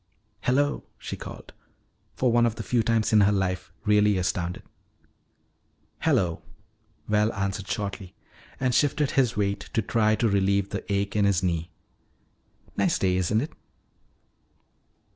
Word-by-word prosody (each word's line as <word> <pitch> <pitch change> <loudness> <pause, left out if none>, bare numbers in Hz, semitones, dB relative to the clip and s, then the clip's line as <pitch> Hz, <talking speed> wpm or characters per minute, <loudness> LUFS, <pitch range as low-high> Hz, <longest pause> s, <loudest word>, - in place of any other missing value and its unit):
"Hello," 145 +6 +1
she - - -6
called, - - -10 0.6
for 125 -2 +2
one 120 0 +4
of 115 - -2
the - - -5
few 120 -2 +1
times 115 0 +1
in 105 - +7
her 100 +1 +5
life 95 -3 -1
really 105 -1 +4
astounded. 90 -1 -2 1.4
"Hello," 85 -4 +1 0.7
Val 105 +1 +2
answered 100 0 -3
shortly 100 -3 -4 0.4
and 130 -1 +1
shifted 145 +1 +2
his 125 -6 +2
weight 100 -1 0
to 115 - +2
try 110 0 +2
to 115 - +1
relieve 100 -1 +1
the - - -5
ache 100 0 -1
in 105 -1 +3
his 100 -2 +2
knee. 85 -1 -1 1.1
"Nice - - +2
day, 90 -1 +1
isn't 95 +4 +1
it?" 150 - -5
100 Hz, 140 wpm, -26 LUFS, 95-115 Hz, 1.4 s, in